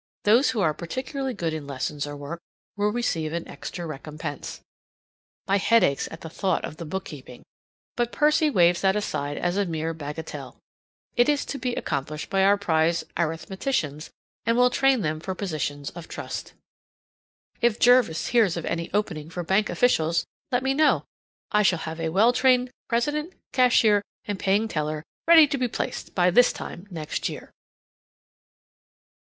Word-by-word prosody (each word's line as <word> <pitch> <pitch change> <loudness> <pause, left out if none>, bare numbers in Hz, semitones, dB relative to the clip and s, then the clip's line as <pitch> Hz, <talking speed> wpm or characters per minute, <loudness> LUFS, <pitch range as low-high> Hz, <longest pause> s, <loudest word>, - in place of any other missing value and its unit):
Those 230 +7 +5
who 225 - 0
are 155 -5 +2
particularly 260 - -4
good 165 -4 -2
in 155 -3 -5
lessons 145 +1 -3
or 145 0 -6
work 145 +4 -6 0.4
will 205 0 +1
receive 165 -10 -1
an 170 0 -3
extra 175 - -7
recompense. 150 -1 -6 0.9
My 195 - +3
head 230 +4 +4
aches 140 - +1
at 165 - -10
the - - -7
thought 185 +2 -1
of 155 - -8
the 170 - -6
bookkeeping, 150 -7 -7 0.5
but 240 0 0
Percy 300 +1 +3
waves 175 -8 +4
that 190 0 +3
aside 145 -8 -2
as 175 +2 -1
a 205 - +2
mere 165 0 -2
bagatelle. 160 +1 -7 0.6
It 240 +3 +4
is 290 -1 +1
to 280 - -5
be 245 -1 -2
accomplished 150 +2 -3
by 195 0 +3
our 200 +1 +5
prize 165 -3 +1
arithmeticians, 165 - -2 0.3
and 230 +1 +1
will 250 0 +5
train 270 -2 +3
them 155 -2 -1
for 185 +3 -4
positions 150 -7 -3
of 170 -2 -10
trust. - - -6 1.1
If 235 -2 +3
Jervis 245 -9 +4
hears 215 -8 +3
of 170 - -4
any 170 0 -3
opening 160 -7 -2
for 175 +1 -4
bank 190 +5 +2
officials, 165 -9 +2 0.3
let 250 0 +1
me 265 0 +2
know; 300 +1 +3 0.5
I 210 - +4
shall 195 -3 +3
have 160 0 -6
a 165 0 -1
well 215 +8 +4
trained 250 -1 +3 0.2
president, 295 +8 -1 0.2
cashier, 235 -5 +4 0.2
and 205 -2 -3
paying 200 +3 +2
teller 155 -4 -2 0.2
ready 330 -2 +9
to 285 -2 -2
be 250 - +1
placed - - -5
by 180 -1 +4
this 245 +7 +6
time 180 +4 -8
next 160 -5 -3
year. - - -9
190 Hz, 165 wpm, -25 LUFS, 160-240 Hz, 1.1 s, ready